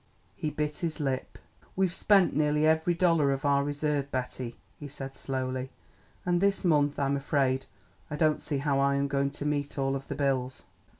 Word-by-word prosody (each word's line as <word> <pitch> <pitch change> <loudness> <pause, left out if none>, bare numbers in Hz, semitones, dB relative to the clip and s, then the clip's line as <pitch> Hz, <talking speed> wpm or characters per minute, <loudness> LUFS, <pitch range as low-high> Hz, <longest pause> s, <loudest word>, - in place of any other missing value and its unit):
He 155 - -2
bit 150 0 -2
his 165 -2 -2
lip. 135 -3 -2 0.4
"We've 190 -2 +1
spent 195 -4 +4
nearly 150 0 +2
every 160 +2 +3
dollar 165 -5 +3
of 135 +2 -2
our 140 0 +3
reserve, 145 -1 -1
Betty," 125 -1 -4 0.2
he 145 - -7
said 135 -1 -7
slowly, 130 -1 -3 0.6
"and 175 0 +2
this 200 -1 +2
month 145 -4 +3
I'm 140 0 +1
afraid 135 -1 0 0.4
I 150 - -3
don't 155 0 +2
see 145 - -2
how 140 0 +1
I 140 0 +3
am 140 0 +1
going 140 0 0
to 140 - -6
meet 145 -1 -1
all 135 0 0
of 135 0 -6
the 140 - -4
bills." 130 -2 -1
145 Hz, 185 wpm, -29 LUFS, 135-155 Hz, 0.6 s, spent